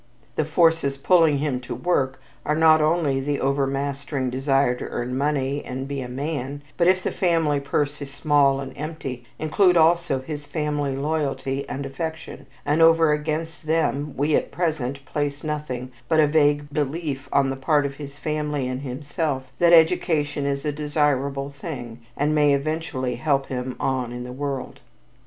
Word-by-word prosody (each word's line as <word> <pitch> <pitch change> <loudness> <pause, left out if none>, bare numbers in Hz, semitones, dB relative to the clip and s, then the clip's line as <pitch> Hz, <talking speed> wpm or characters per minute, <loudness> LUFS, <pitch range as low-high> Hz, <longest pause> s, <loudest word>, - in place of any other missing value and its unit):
The 155 - +1
forces 160 -3 +2
pulling 160 0 +4
him 140 -3 -1
to 125 - -6
"work" 135 -7 0 0.2
are 150 - 0
not 160 0 +6
only 155 -3 +2
the 145 +1 -1
overmastering 140 0 -1
desire 135 0 +2
to 125 - -6
earn 125 +1 -3
money 140 0 0
and 130 +1 -5
be 140 -1 -3
a 125 - -5
man, 140 +1 -4
but, 170 - +2
if 185 0 +3
the - - -1
family 165 -5 +1
purse 145 +1 -1
is 140 -1 -6
small 140 -1 +3
and 135 -1 -6
empty, 140 -5 -6
include 180 +3 +3
also 170 -3 +3
his 145 +2 -6
family 150 -3 -1
loyalty 140 -2 -2
and 140 +1 -4
affection, 160 +4 -6 0.2
and 150 +3 +2
over 165 -1 +6
against 155 +1 -3
them, 150 -3 0
we 145 +2 +2
at - - 0
present 140 -6 -2
place 145 0 -3
nothing 145 -5 -4 0.2
but 160 -1 +3
a 155 - +7
vague 145 -1 +3
belief 145 -2 -2
on 135 -1 +3
the - - -3
part 145 +2 +2
of 140 0 -4
his 145 -1 -9
family 150 -3 -2
and 130 +1 -3
himself 140 +1 -3
that 170 -1 +5
education 160 -4 +3
is 140 +1 -2
a 150 - +1
desirable 145 -2 0
thing 135 -5 -7 0.2
and 150 +2 +1
may 150 -1 +4
eventually 140 -4 -2
help 135 0 +1
him 125 0 -3
"on 130 -3 -1
in 125 0 -5
the 125 0 -7
world." 140 0 -4
145 Hz, 170 wpm, -24 LUFS, 135-155 Hz, 0.2 s, a